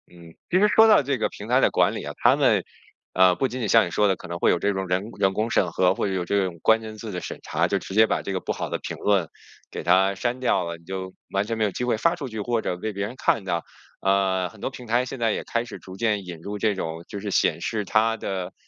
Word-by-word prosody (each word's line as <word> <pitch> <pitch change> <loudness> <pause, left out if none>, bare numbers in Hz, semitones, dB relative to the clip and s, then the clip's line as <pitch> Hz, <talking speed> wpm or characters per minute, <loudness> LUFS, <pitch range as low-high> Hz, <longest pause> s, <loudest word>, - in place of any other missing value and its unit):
嗯， 85 -2 -15 0.2
其 185 - +3
实 210 - +5
说 220 +1 +6
到 215 -9 +6
这 135 0 -1
个 110 - 0
平 105 - -10
台 125 +2 +4
的 - - +4
管 - - +3
理 - - -5
啊， - - -6
他 - - +4
们 - - +3 0.5
啊， 95 -1 +5
不 130 - 0
仅 130 +1 -6
仅 115 - -1
像 115 -3 +6
你 85 - -6
说 105 +5 +3
的 95 - +2
可 - - -11
能 85 +1 -4
会 - - +3
有 - - +3
这 100 - +1
种 95 -1 -3
人 95 +5 -1
人 95 -1 +3
工 110 +3 -1
审 90 - +2
核， 90 +2 +3
会 95 0 -2
有 90 -2 -2
这 100 +2 +1
种 85 -2 -6
关 110 0 +4
键 110 -1 -8
字 110 0 -7
的 90 -2 -4
审 - - -7
查， - - 0
就 - - 0
直 - - -9
接 110 +2 +5
把 - - 0
这 100 - -4
个 95 - -1
不 - - -4
好 - - -4
的 - - -2
评 - - -6
论 100 -5 +1 0.4
给 - - -6
它 95 +2 +3
删 120 +5 -2
掉 125 -7 +1
了， 85 0 -5
你 85 - -23
就 95 0 -5 0.2
完 100 +1 0
全 115 +1 -3
没 110 - +1
有 105 - +1
机 125 - -4
会 120 - +1
发 170 +9 +2
出 150 -6 -6
去， 110 -3 -6
或 115 +1 0
者 90 - -3
被 110 +4 -4
别 100 +1 -2
人 120 - -7
看 110 - +1
到， 85 -3 -1 0.4
啊， 95 -2 +1
很 110 - -17
多 - - -3
平 125 -2 -11
台 120 +3 +2
现 130 0 -7
在 115 -1 +2
也 - - -2
开 115 0 -2
始 120 - -8
逐 95 - -11
渐 105 -3 0
引 85 -2 -8
入 100 +5 -6
这 105 +1 +1
种 80 -2 -5
就 100 - -6
是 105 +1 -5
显 - - +1
示 110 -4 -2
它 115 +3 +2
的 95 -4 -4
100 Hz, 320 characters per minute, -24 LUFS, 95-115 Hz, 0.5 s, 说